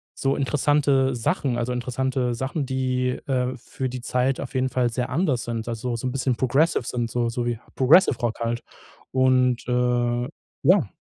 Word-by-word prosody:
so 135 0 0
interessante 140 -1 +2
Sachen, 125 - 0
also, 120 +1 -1
interessante 125 0 -1
Sachen, 135 +3 -2
die, 130 -1 0 0.2
äh, 130 -1 0
für 130 +2 -5
die 125 -1 -6
Zeit 125 +2 0
auf 135 - -6
jeden 130 0 +1
Fall 125 -2 +1
sehr 125 +1 -2
anders 140 -4 0
sind, 115 -1 -4
also 115 +1 -3
so 115 - -5
'n - - -1
bisschen 130 -1 0
progressive 135 +6 +2
sind 120 -2 -2
so 120 0 0
so 120 +1 -2
wie 120 -2 -1 0.2
Progressive 135 0 +5
Rock 120 -3 -2
halt. 115 0 -1 0.5
Und, 130 -1 +3
äh, 125 0 +1 0.4
ja. 175 - +4
125 Hz, 175 wpm, -24 LUFS, 120-130 Hz, 0.5 s, Progressive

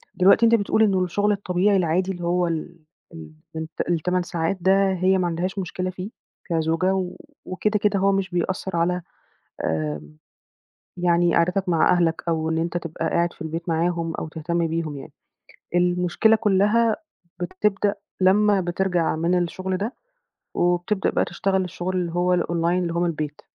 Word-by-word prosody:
دلوقتي 195 +5 +5
أنت 230 0 +6
بتقول 220 0 +2
إن 190 -3 +2
الشُغل 205 +4 +1
الطبيعي 195 0 +1
العادي 185 +2 +1
اللي 175 -2 -7
هو 175 +1 +1
ال 170 +1 -4 0.3
ال 160 -1 -10 0.3
الت 160 +1 -5
ال8 180 +2 0
ساعات 175 +1 -2
ده 190 +1 +3
هي 185 +1 +2
ما 180 -1 0
عندهاش 180 +4 -2
مشكلة 185 0 -3
فيه 185 +2 -6 0.4
كزوجة 165 +3 +1
و 185 -1 -3 0.3
وكده، 210 +3 -1
كده 205 -1 +1
هو 195 +1 +3
مش 195 -1 0
بيأثّر 185 +1 -2
على 180 +2 +1 0.6
آمم، 75 -1 -3 0.8
يعني 175 -1 +2
قعدتك 180 +2 +1
مع 165 -2 +4
أهلك 170 -2 +1
أو 160 -1 0
إن 160 - 0
أنت 170 +1 -2
تبقى 165 -2 -3
قاعد 170 0 +1
في - - -9
البيت 165 +2 -5
معاهم 165 0 0
أو - - -4
تهتم 170 +2 -2
بيهم 160 -2 -3
يعني. 135 - -11 0.6
المشكلة 180 +5 +3
كُلّها 215 +2 +2 0.4
بتبدأ 195 +3 0 0.3
لمّا 200 +1 +4
بترجع 175 -2 0
من 170 +3 +1
الشُغل 185 +2 -3
ده 215 +7 -3 0.6
وبتبدأ 175 +3 +1
بقى - - +1
تشتغل 190 +2 0
الشُغل 180 +1 -4
اللي 175 -2 -1
هو 180 +1 +2
الonline - - -2 0.3
اللي 170 -1 -2
هو 170 - -1
من - - +2
البيت. 150 -2 -5
180 Hz, 165 wpm, -23 LUFS, 170-190 Hz, 0.8 s, أنت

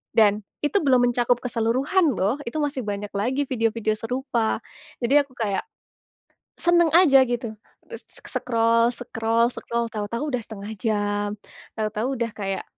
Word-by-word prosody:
dan 210 -2 +4 0.2
itu 405 - +2
belum 250 -3 +4
mencakup 245 0 +2
keseluruhan 255 +7 +1
loh, 200 +9 +1
itu - - -4
masih 285 -3 -1
banyak 205 0 -4
lagi 260 +7 0
video-video 225 -3 0
serupa. 240 -1 -1 0.4
Jadi 240 +4 +2
aku 275 -2 -11
kayak 205 -4 -1 1.0
seneng 345 -1 +4
aja 295 -7 +7
gitu, 235 -2 -3 0.4
e - - -7
s - - -18
s - - -16
scroll 230 0 +3
scroll 230 -1 0
scroll 235 0 -2
tahu-tahu 230 +7 -3
udah 250 - +1
1/2 210 0 -8
jam, 205 -1 0 0.5
tahu-tahu 215 +4 -1
udah 235 -1 -1
kayak, 195 -1 -3
230 Hz, 145 wpm, -24 LUFS, 215-255 Hz, 1.0 s, aja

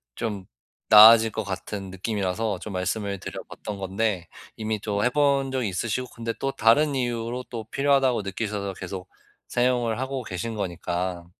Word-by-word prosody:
좀 105 -5 -4 0.4
나아질 110 +1 +9
것 110 - -3
같은 95 0 -5
느낌이라서 100 +1 -2
좀 105 - -7
말씀을 100 +2 -2
드려 - - -6
봤던 105 -2 -7
건데 95 -2 -1 0.3
이미 110 -1 -2
또 100 -1 -1
해 125 - +4
본 140 -1 +2
적이 130 -5 -1
있으시고 115 +6 -2
근데 115 -1 -3
또 135 - -1
다른 140 +6 +4
이유로 120 0 -2
또 115 -3 -5
필요하다고 135 -4 +2
느끼셔서 100 0 -3
계속 90 0 -7 0.4
사용을 120 -2 +1
하고 130 0 -3
계신 105 +3 -4
거니까. 90 -2 -3
110 Hz, 330 characters per minute, -25 LUFS, 95-120 Hz, 0.4 s, 나아질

